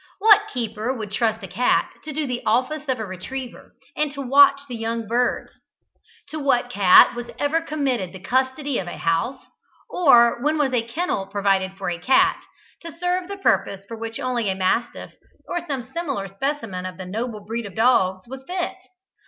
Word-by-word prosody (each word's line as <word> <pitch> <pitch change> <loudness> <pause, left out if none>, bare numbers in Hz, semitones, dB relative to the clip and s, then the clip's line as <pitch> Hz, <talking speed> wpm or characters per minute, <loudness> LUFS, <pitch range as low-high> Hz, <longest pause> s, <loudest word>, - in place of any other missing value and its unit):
What 420 +1 +6
keeper 230 - -3
would 220 -6 -5
trust 220 0 0
a - - -5
cat 240 +7 +1
to 310 - -5
do 305 +1 -2
the 250 -2 -3
office 260 +7 0
of 260 - +1
a 220 - -4
retriever, 240 +7 -8 0.2
and 300 -1 0
to 280 - -6
watch 275 +1 +6
the 250 - -6
young 230 0 -3
birds? 245 +3 0 0.8
To 310 - -5
what 245 -4 +1
cat 195 -5 +7
was 240 0 -6
ever 310 +3 +1
committed 270 - -2
the 190 - -10
custody 260 +6 -1
of 180 - -5
a - - -6
house, 165 +11 -1 0.5
or 240 -8 +5
when 305 +3 +1
was 280 -3 +1
a 245 - +2
kennel 235 - -3
provided 195 -2 0
for 190 -2 -3
a 170 - -4
cat, 360 - +3 0.4
to 335 - -8
serve 355 +2 -2
the 400 +1 -6
purpose 195 - 0
for 230 - -7
which 225 +2 -6
only 250 -5 -1
a 190 - 0
mastiff, 190 +6 -1 0.3
or 350 -1 -3
some 265 -3 -5
similar 280 - -3
specimen 195 -4 -4
of 185 - -9
the 190 - -7
noble 215 +3 -4
breed 225 +1 -4
of 190 - -12
dogs, 190 -5 +2
was 265 +2 -9
fit? 360 0 -2
245 Hz, 185 wpm, -22 LUFS, 205-285 Hz, 0.8 s, cat